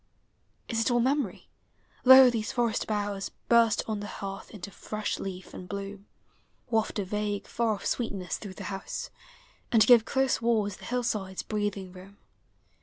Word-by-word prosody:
Is 225 -1 0
it 225 - +2
all 240 -1 +3
memory? 260 -5 0 0.6
Lo, 260 0 +10
these 220 -2 -2
forest 235 -3 0
boughs 205 -2 -2 0.2
Hurst 230 -2 +5
on 215 -2 -2
the 205 - -5
hearth 195 -1 -7
into 200 -1 -8
fresh 215 +3 -4
leaf 185 -1 -7
and 180 - -9
bloom; 200 0 -6 0.6
Waft 220 -1 +1
a 200 - -1
vague, 205 +1 -2
far 230 -2 0
oil' 205 - -5
sweetness 200 -7 -2
through 195 -3 -8
the 200 - -8
house, 195 - -5 0.6
And 220 -3 +6
give 235 -1 +7
close 265 -1 +1
walls 215 -4 +1
the - - -12
hillside's 215 -6 -2
breathing 205 -3 -3
room. 190 +2 -13
210 Hz, 160 wpm, -28 LUFS, 195-230 Hz, 0.6 s, Lo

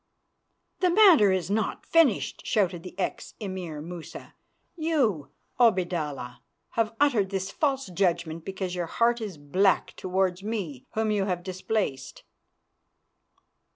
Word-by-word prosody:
"The 365 - +3
matter 345 - +7
is 190 0 -1
not 215 -1 -1
finished," 320 -10 +2
shouted 185 -5 +1
the 180 +1 -11
ex 190 - -4
Emir 185 -7 -5
Musa. 170 +1 -9 0.4
"You, 265 - 0 0.3
Obaidallah, 175 - +1 0.3
have 225 0 -1
uttered 240 -10 +3
this 195 0 -3
false 275 0 0
judgment 170 -3 -1
because 190 -1 -4
your 175 -2 -2
heart 235 +5 +1
is 200 -7 -5
black 185 +7 +1
towards 185 0 0
me 195 - -4
whom 220 0 +1
you 205 -2 +1
have 180 -2 -2
displaced." 185 -5 -3
190 Hz, 120 wpm, -27 LUFS, 175-220 Hz, 0.4 s, matter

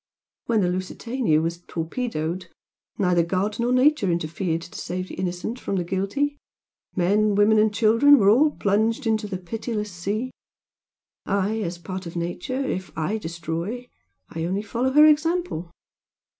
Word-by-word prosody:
When 225 -3 +2
the 180 - +2
'Lusitania' 185 0 0
was 170 +1 -2
torpedoed 170 0 -3 0.5
neither 180 -5 +3
God 190 +6 -1
nor 240 +1 +1
Nature 255 -4 +3
interfered 170 0 -2
to 170 - -9
save 185 +1 -4
the - - -8
innocent 185 +6 -3
from 200 - -3
the 180 - 0
guilty 200 +12 -1 0.6
men, 205 +3 +2
women 210 +1 +5
and 215 0 +4
children 230 +7 +5
were 195 - +3
all 285 +8 +5
plunged 225 +1 0
into 220 -1 0
the 195 -2 -4
pitiless 210 +3 -4
sea. 205 +8 -3 1.0
I 200 +2 0
as 175 -4 -3
a - - -22
part 185 0 -6
of 170 - -9
Nature 175 +10 -3
if 185 -5 -3
I 180 +8 -1
destroy, 170 +8 -5 0.4
I 160 - -5
only 190 +4 -1
follow 240 +4 -1
her 300 +3 +7
example. 310 - +2
200 Hz, 155 wpm, -24 LUFS, 175-235 Hz, 1.0 s, her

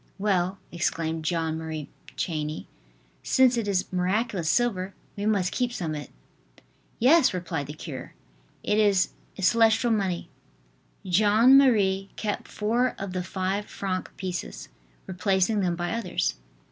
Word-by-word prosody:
"Well," 190 -2 0
exclaimed 165 -1 -2
Jeanne 160 -1 -1
Marie 160 -2 -5 0.3
Chaney, 155 -2 -3 0.6
"since 260 -1 +4
it 230 -3 -1
is 190 -2 -1
miraculous 185 -1 0
silver, 195 -2 0 0.2
we 205 +1 -2
must 195 -4 +1
keep 245 -1 -1
some 170 -9 -3
of 150 - -4
it." 145 - -11 0.9
"Yes!" 260 - +5
replied 165 -5 -3
the 145 - -6
cure, 150 -4 -8 0.5
"it 210 +1 +1
is 200 -3 +3 0.3
celestial 225 +4 +4
money." 190 -5 -1 0.8
Jeanne 215 +7 +5
Marie 200 -8 +4
kept 210 -2 -3
four 235 +4 0
of 195 -2 -5
the 185 - -1
five 190 +3 -2
franc 185 -2 -3
pieces, 185 -2 -5 0.4
replacing 190 +3 +1
them 180 -3 0
by 175 0 -3
others. 230 -6 -1
190 Hz, 135 wpm, -26 LUFS, 175-215 Hz, 0.9 s, Yes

